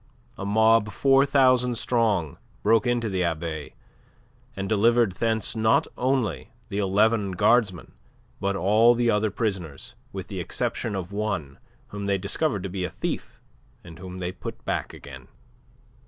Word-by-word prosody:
A 100 - -5
mob 110 0 +4
four 135 +5 +4
thousand 130 -3 +3
strong 110 - 0 0.2
broke 110 +2 +3
into 120 -2 0
the 95 -3 -1
Abbaye, 80 -3 -3 0.8
and 95 0 -4
delivered 115 +1 +3
thence 110 +2 -1
not 110 0 +3
only 125 -4 -1 0.2
the 100 -1 -3
eleven 105 +1 +2
guardsmen, 100 -2 +2 0.5
but 100 0 -1
all 110 +5 +4
the 120 -1 +2
other 105 +1 +1
prisoners, 95 - -4 0.2
with - - -6
the - - -5
exception 110 -4 -2
of 95 -1 -5
one 100 -10 -3 0.3
whom 100 -1 -5
they 100 -1 +2
discovered 100 - -1
to - - -2
be 90 0 -4
a 90 - -2
thief, - - -5 0.4
and 80 -1 -12
whom 90 0 -8
they 90 -1 -3
put 90 - -9
back - - -2
again. 65 -3 -11
105 Hz, 150 wpm, -25 LUFS, 95-115 Hz, 0.8 s, mob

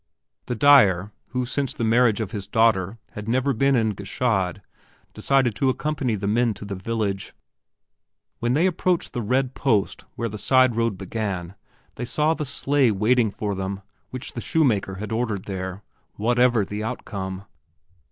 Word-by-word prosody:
The 125 - -2
dyer 105 -8 +5 0.2
who 125 -1 -2
since 135 +1 -2
the - - -3
marriage 115 -1 +3
of 105 -3 -4
his 100 -4 -5
daughter 110 -2 +2
had 105 0 -8
never 130 +3 +1
been 135 +3 +2
in 110 -3 +2
Gschaid 100 -2 -1 0.5
decided 135 -4 +2
to 130 +6 +1
accompany 135 -3 -1
the 100 -1 -4
men 115 +2 +2
to - - -9
the 100 - -5
village. 100 0 -3 1.0
When 120 +1 0
they 160 +6 +3
approached 180 -1 0
the 120 - -2
red 130 +4 0
post 110 -8 0
where 115 - -2
the 105 -1 -6
side 130 -1 +4
road 115 -4 0
began 95 -3 -4 0.4
they 120 - -3
saw 150 +6 +1
the 155 - -4
sleigh 135 -1 +2
waiting 110 +3 +2
for 100 0 -3
them 95 0 -4 0.3
which 130 -1 -6
the 120 - -5
shoemaker 115 -13 +1
had 105 +3 -6
ordered 110 -4 -1
there, 95 0 -5 0.3
whatever 120 0 +3
the 105 +2 -5
outcome. 100 -5 -5
115 Hz, 160 wpm, -24 LUFS, 100-125 Hz, 1.0 s, dyer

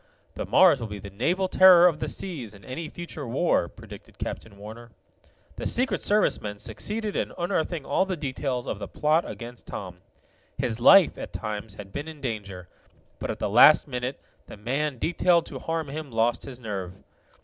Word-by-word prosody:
"The - - -5
Mars 180 -7 +6
will 115 - -3
be 105 -1 -7
the 100 0 -10
naval 170 - 0
terror 185 -2 +7
of 165 -4 +3
the - - -3
seas 130 - -5
in 100 -2 -16
any 155 - -6
future 165 -5 -7
war," 125 - +1
predicted - - -13
Captain 105 -3 -6
Warner. 110 +3 -10 0.7
The - - -2
Secret 255 +2 +1
Service 210 0 +2
men 105 -1 -5
succeeded 205 - -3
in - - -1
unearthing 170 -3 -2
all 190 - +1
the 185 -2 -2
details 130 -3 -3
of 100 - -4
the - - -5
plot 155 +3 +1
against 120 0 -9
Tom. 90 -3 -7 0.6
His 115 0 -2
life, 190 +8 +6
at - - -7
times, 105 -2 -5
had 100 -1 -11
been 145 +2 -5
in 160 -2 -9
danger, 100 -8 -5 0.5
but - - -4
at - - -3
the - - -2
last 125 +10 +7
minute 125 0 -4 0.3
the - - -10
man 135 +6 -2
detailed 170 +4 +2
to - - -7
harm 165 -2 -3
him 150 +1 -6
lost 115 0 0
his 130 -3 -8
nerve. 95 -6 -5
130 Hz, 185 wpm, -26 LUFS, 110-165 Hz, 0.7 s, terror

